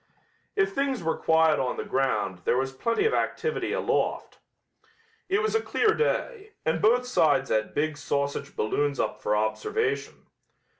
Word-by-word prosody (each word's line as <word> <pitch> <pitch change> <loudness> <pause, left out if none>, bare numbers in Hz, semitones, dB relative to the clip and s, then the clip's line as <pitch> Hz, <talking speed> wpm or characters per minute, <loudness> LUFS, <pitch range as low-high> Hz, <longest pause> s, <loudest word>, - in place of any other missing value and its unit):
If 410 -1 +1
things 275 - -1
were 165 - 0
quiet 160 -1 +3
on 130 -2 -1
the - - -3
ground 105 -9 -1
there 120 - +2
was 135 +1 -1
plenty 230 - 0
of 450 - +2
activity 465 - -1
aloft. - - -1 0.9
It 400 +3 +2
was 435 - 0
a 445 - +2
clear 435 -1 +2
day, 440 -2 -2
and 160 0 0
both 245 +3 +4
sides 145 - +2
had 110 0 0
big 155 0 0
sausage 140 0 -2
balloons 140 +6 0
up - - -2
for 105 - +1
observation. 425 - -2
160 Hz, 155 wpm, -26 LUFS, -, 0.9 s, both